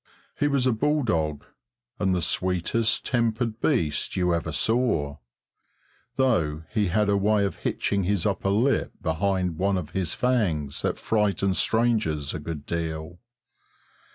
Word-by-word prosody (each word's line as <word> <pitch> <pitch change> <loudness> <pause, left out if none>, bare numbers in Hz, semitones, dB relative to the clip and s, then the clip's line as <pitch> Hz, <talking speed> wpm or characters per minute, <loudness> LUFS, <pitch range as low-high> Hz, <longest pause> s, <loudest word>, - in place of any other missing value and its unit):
He 145 - +3
was 140 -3 +1
a 130 - +4
bull 150 +6 +1
dog, 80 -9 -1 0.5
and 95 -1 +1
the 90 - 0
sweetest 95 +5 +1
tempered 115 -2 0
beast 95 - 0
you 90 -2 +1
ever 85 -1 -2
saw, 80 - +1 1.0
though 80 - +1
he 105 -2 +1
had 105 +4 +1
a 100 - +3
way 100 +1 +2
of 100 - -3
hitching 100 -2 -1
his 100 -2 0
upper 100 -1 0
lip 120 +8 +1
behind 90 0 0
one 100 0 +2
of 80 -5 -5
his 90 -4 -1
fangs 90 - 0
that - - -1
frightened 100 -3 +1
strangers 110 -11 +1
a - - -4
good 75 -1 -6
deal. 80 +1 -4
95 Hz, 145 wpm, -25 LUFS, 80-110 Hz, 1.0 s, a